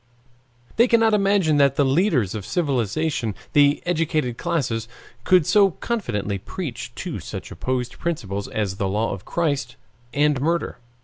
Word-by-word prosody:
They 235 +2 +6
cannot 225 -2 +4
imagine 195 -6 +3
that 140 -2 +4
the 145 - +3
leaders 135 - +2
of 105 -3 -5
civilization, 135 - -1 0.2
the 145 0 +4
educated 155 -7 0
classes, 120 -9 -2 0.4
could 180 -4 +4
so 200 +2 +5
confidently 105 - -2
preach - - -6
two - - -5
such - - -7
opposed 125 -1 -3
principles 100 - -3
as 100 -3 -2
the 100 -2 -1
law 105 +3 0
of 95 -2 -8
Christ 140 -7 -1 0.4
and 145 -1 +2
murder. 170 -1 -1
145 Hz, 140 wpm, -23 LUFS, 115-170 Hz, 0.4 s, They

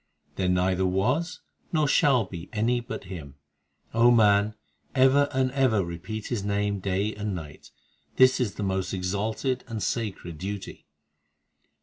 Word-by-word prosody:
There 95 -1 0
neither 90 +1 +2
was 125 - 0 0.3
nor 155 -3 +2
shall 135 -5 +4
be 90 -2 -9
any 115 +3 +1
but 120 +2 -6
Him; 80 -8 -9 0.6
O 115 +1 +5
man, 105 -2 +4 0.4
ever 135 +2 +5
and 130 -1 +1
ever 125 -8 +2
repeat 95 +6 -6
His 115 -5 -2
name 100 0 0
day 100 +3 -1
and 105 -2 -3
night; 75 -4 -9 0.5
This 130 0 +5
is 120 -6 -1
the 105 - -4
most 95 0 -1
exalted 105 +8 -2
and 110 -3 -4
sacred 95 -8 -3
duty. 100 +1 -6
105 Hz, 140 wpm, -26 LUFS, 95-125 Hz, 0.6 s, O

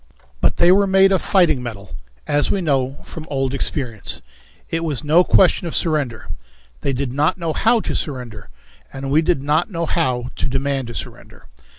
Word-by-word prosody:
But - - +2
they 175 +1 +5
were 200 +1 +4
made 195 0 +5
of 190 - +2
fighting 170 -9 +3
metal, 100 -9 -8 0.3
as 145 0 +1
we 200 - +1
knew 135 -6 0
from 160 -1 -9
old 135 -2 -1
experience. 125 -6 -2 0.5
It 165 0 -1
was 155 -3 -3
no 160 +4 +5
question 180 -1 +3
of 165 - -4
surrender. 145 -8 -1 0.5
They 140 - 0
did 130 -1 -3
not 150 +7 +1
know 165 -3 -2
how 230 +5 +2
to - - -3
surrender, 125 - -5 0.4
and 135 0 -5
we 155 +3 +4
did 165 -4 0
not 155 +7 +1
know 170 -4 -2
how 125 -5 -1
to - - -1
demand 135 -1 -1
a 120 - -8
surrender. - - -9
145 Hz, 185 wpm, -20 LUFS, 130-170 Hz, 0.5 s, they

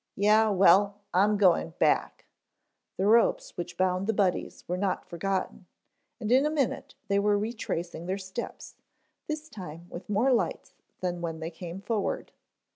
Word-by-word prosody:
"Yeh, 215 +2 +4
well, 200 +1 +5 0.2
I'm 205 +3 +4
going 175 -4 +3
back." - - +1 0.7
The 190 - 0
ropes 230 +3 +3
which 175 0 -6
bound 185 +1 +1
the 225 - +2
Buddies 195 -3 0
were 180 - -1
not 190 0 -1
forgotten, 185 +1 -3 0.5
and 220 -1 -3
in 260 +2 +6
a 300 - +2
minute 295 -5 -2
they 200 0 +2
were 205 0 +3
retracing 180 -6 -4
their 190 +1 -1
steps, 190 +4 -7 0.5
this 310 0 -4
time 175 - -9
with 175 - -9
more 230 +6 +3
lights 235 - -1 0.3
than 175 -1 -2
when 165 -2 -4
they 165 +1 -5
came 175 +2 -8
forward. 210 -1 -2
195 Hz, 155 wpm, -28 LUFS, 180-215 Hz, 0.7 s, in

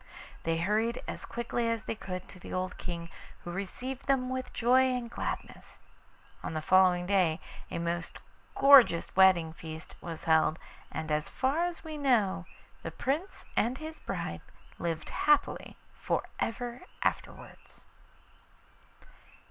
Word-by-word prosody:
They 165 0 +1
hurried 215 +7 +1
as - - -5
quickly 235 0 -1
as 230 -1 -1
they - - -2
could 185 -4 -6
to 185 - -12
the - - -10
old 185 0 -3
King, 170 -1 -5 0.3
who 175 - -5
received 245 +9 -5
them 260 -2 +2
with 260 0 -3
joy 255 +3 +4
and 235 -2 -4
gladness. - - -5 0.6
On - - -5
the - - +1
following 180 -1 +5
day 180 -4 +2 0.3
a - - -3
most 170 0 -2 0.4
gorgeous 270 -11 +7
wedding 185 -4 +6
feast 160 -1 -9
was 165 -2 -6
held, 160 -1 +4 0.3
and 160 -1 -4
as 150 +1 0
far 285 +6 +1
as 350 -2 -4
we 310 -2 -6
know 215 -10 +2 0.3
the - - -4
Prince 280 - -3
and 245 +4 +2
his 315 +1 -7
bride - - -4 0.4
lived 165 -2 -3
happily 295 -1 +2 0.2
for - - -1 0.2
ever 240 +1 -3 0.2
afterwards. - - -4
195 Hz, 140 wpm, -30 LUFS, 170-255 Hz, 0.6 s, gorgeous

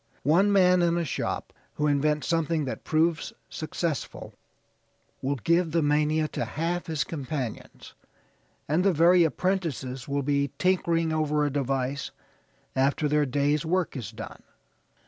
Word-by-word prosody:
One 180 +8 +4
man 180 -2 +5
in 170 0 +2
a 170 - 0
shop - - -3 0.2
who 150 - 0
invents 150 0 +1
something 165 -2 +1
that 130 - -5
proves 160 +1 +1 0.2
successful 160 -1 -4 0.9
will 140 +2 0
give 170 - +2
the 165 -2 +2
mania 150 +1 +2
to - - -3
half 170 +3 -2
his 160 -3 0
companions, 140 -6 -6 0.7
and 155 +5 +2
the 195 -1 +3
very 170 +2 +5
apprentices 160 -6 -2
will 140 0 -1
be 140 0 +1
tinkering 170 -3 +1
over 150 -1 +1
a 145 - -1
device 135 0 -1 0.7
after 140 +3 +2
their 150 0 +2
day's 145 +3 +1
work 175 +1 0
is 120 -8 -5
done." 110 0 -9
155 Hz, 140 wpm, -27 LUFS, 140-170 Hz, 0.9 s, man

